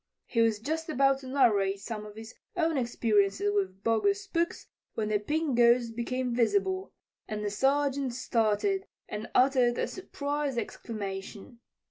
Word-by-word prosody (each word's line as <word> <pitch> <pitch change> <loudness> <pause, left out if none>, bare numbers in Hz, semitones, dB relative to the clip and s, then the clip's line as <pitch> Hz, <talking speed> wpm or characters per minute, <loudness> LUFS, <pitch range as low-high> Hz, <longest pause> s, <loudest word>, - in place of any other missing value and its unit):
He 230 - +1
was 225 -2 +3
just 315 +9 -3
about 275 -2 +3
to 265 - -10
narrate 210 -8 +2
some 210 +1 -6
of 210 - -12
his 225 +1 -9 0.2
own 330 -2 +1
experiences 205 -5 +1
with 195 -1 -1
bogus 395 - +2
spooks 340 -2 -2 0.3
when 215 -1 -1
the 210 -1 +2
Pink 300 +5 -1
Ghost 235 -1 +4
became 250 +1 -2
visible, 375 - +1 0.4
and 210 0 -4
the 205 - -1
Sergeant 275 +3 +1
started 250 - 0 0.2
and 210 +1 -6
uttered 250 -2 +4
a - - +1
surprised 290 -6 -3
exclamation. 210 0 -6
240 Hz, 145 wpm, -29 LUFS, 210-285 Hz, 0.4 s, Ghost